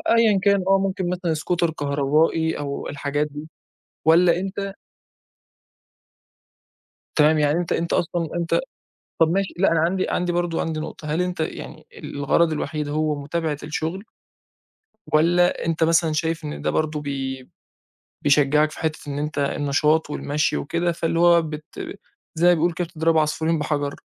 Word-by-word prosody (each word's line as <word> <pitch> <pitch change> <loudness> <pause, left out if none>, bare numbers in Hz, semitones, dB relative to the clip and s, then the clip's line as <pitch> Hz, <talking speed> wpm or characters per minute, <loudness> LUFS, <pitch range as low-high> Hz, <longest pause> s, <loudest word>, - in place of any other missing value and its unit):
أيًّا 220 -4 +4
كان 200 -2 +3
آه 195 - +5
ممكن 190 -2 -1
مثلًا 180 -2 -1
Scooter 170 +2 0
كهربائي 150 +2 +1
أو 140 -1 -4
الحاجات 145 +1 -2
دي، 150 +2 -9 0.6
والّا 170 +2 +5
أنت 195 +1 -4 2.4
تمام 155 +1 +5
يعني 150 +3 +2
أنت 175 - -3
أنت 170 0 0
أصلًا 170 -1 0
أنت 170 -1 +1 0.6
طَب 160 -1 +5
ماشي 195 +1 0
لأ 195 0 +3
أنا 165 - +3
عندي 185 +3 +1
عندي 175 0 0
برضه 175 -1 -1
عندي 160 -1 -2
نقطة، 155 0 -7
هل 165 - +1
أنت 180 -1 -3
يعني 160 - -5
الغرض 155 +4 +1
الوحيد 150 0 -3
هو 155 0 0
متابعة 155 0 -2
الشغل؟ 160 +5 -3 1.1
والّا 175 +3 +3
أنت 165 0 0
مثلًا 165 0 +3
شايف 160 +1 -1
إن 150 - -5
ده - - 0
برضه 155 -1 -1
بي 135 -2 -4 0.7
بيشجّعك 150 +1 +3
في - - -10
حتّة 160 -1 -2
إن 140 0 -3
أنت 150 0 -4
النشاط 145 +2 +1
والمشي 145 -1 -1
وكده، 170 +4 -1
فاللي 165 0 -1
هو 170 0 +6
بت 155 -1 -6 0.7
زي 170 +2 +3
ما 180 - +7
بيقولوا 170 +1 +1
كده 175 -1 -2
بتضرب 165 -1 +1
عصفورين 160 +1 +1
بحجر؟ 145 -1 -2
160 Hz, 150 wpm, -23 LUFS, 150-175 Hz, 2.4 s, ما